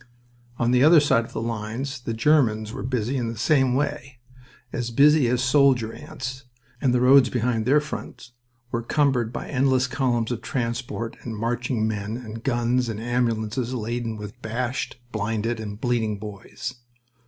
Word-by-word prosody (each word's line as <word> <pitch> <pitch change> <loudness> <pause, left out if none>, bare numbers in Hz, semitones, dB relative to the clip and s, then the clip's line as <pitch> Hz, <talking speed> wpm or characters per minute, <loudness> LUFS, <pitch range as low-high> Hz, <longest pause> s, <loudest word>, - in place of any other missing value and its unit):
On 120 0 +1
the 125 +1 +4
other 160 +2 +8
side 115 -5 +3
of - - -14
the - - -3
lines 115 +4 -4
the 115 -2 -3
Germans 115 -5 +2
were 130 - -5
busy 125 +1 -1
in 120 -2 -1
the 115 0 -5
same 130 +1 +3
way, 135 -2 -2 0.6
as 120 -1 -2
busy 145 +2 +5
as 125 +1 +1
soldier 130 -4 +3
ants, 130 -2 -7 0.4
and 130 - +3
the 125 0 +2
roads 130 0 +6
behind 120 -2 0
their 145 +3 +5
front 145 -4 -7 0.4
were 115 - -1
cumbered 125 -3 +1
by - - -5
endless 130 -1 +2
columns 125 -4 0
of 115 -2 -3
transport 115 -1 -3
and 115 -3 -6
marching 115 0 -1
men, 105 +1 -3
and 115 -2 -8
guns 120 -1 +1
and 110 -2 -4
ambulances 120 +1 -1
laden 115 -1 -3
with 105 -1 -9
bashed, 120 +4 -3
blinded, 110 +2 -1
and 105 -1 -6
bleeding 115 -3 0
boys. 110 +5 -7
120 Hz, 165 wpm, -24 LUFS, 115-130 Hz, 0.6 s, other